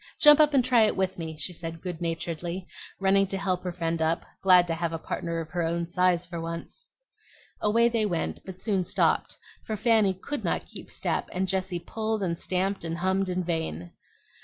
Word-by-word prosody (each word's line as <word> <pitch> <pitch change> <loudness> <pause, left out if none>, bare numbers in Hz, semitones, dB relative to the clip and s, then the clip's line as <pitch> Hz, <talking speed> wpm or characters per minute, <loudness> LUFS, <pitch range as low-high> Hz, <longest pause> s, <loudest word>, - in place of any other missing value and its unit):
Jump 295 0 +8
up 300 -1 +5
and 255 -3 +4
try 250 -2 +5
it - - -1
with 190 -1 -1
me!" 160 -1 -5
she 155 +4 -4
said 165 -1 -5
good 175 -1 -6
naturedly, 170 +2 -3 0.3
running 195 0 +4
to 195 - -3
help 185 -2 -1
her 180 - -2
friend 165 -1 -2
up, 160 +1 +1 0.2
glad 180 -2 +6
to 170 - -2
have 165 0 -2
a 165 - -2
partner 165 +1 -3
of 160 -1 -6
her 175 - -1
own 170 +1 0
size 180 0 +2
for 170 -1 -6
once. 170 - -6 0.7
Away 230 +3 +4
they 230 -2 +1
went, 170 -4 -2
but 190 -1 -9
soon 195 -4 0
stopped; - - +1 0.3
for 220 - -3
Fanny 220 -4 +3
could 285 +10 -5
not - - -1
keep - - -10
step, - - -2
and 190 +1 -1
Jessie 185 -1 -1
pulled 220 +3 -3
and 170 -2 -1
stamped 190 +1 -1
and 165 0 -3
hummed 190 +2 +1
in 180 0 -1
vain. 160 - -3
180 Hz, 205 wpm, -27 LUFS, 170-195 Hz, 0.7 s, Jump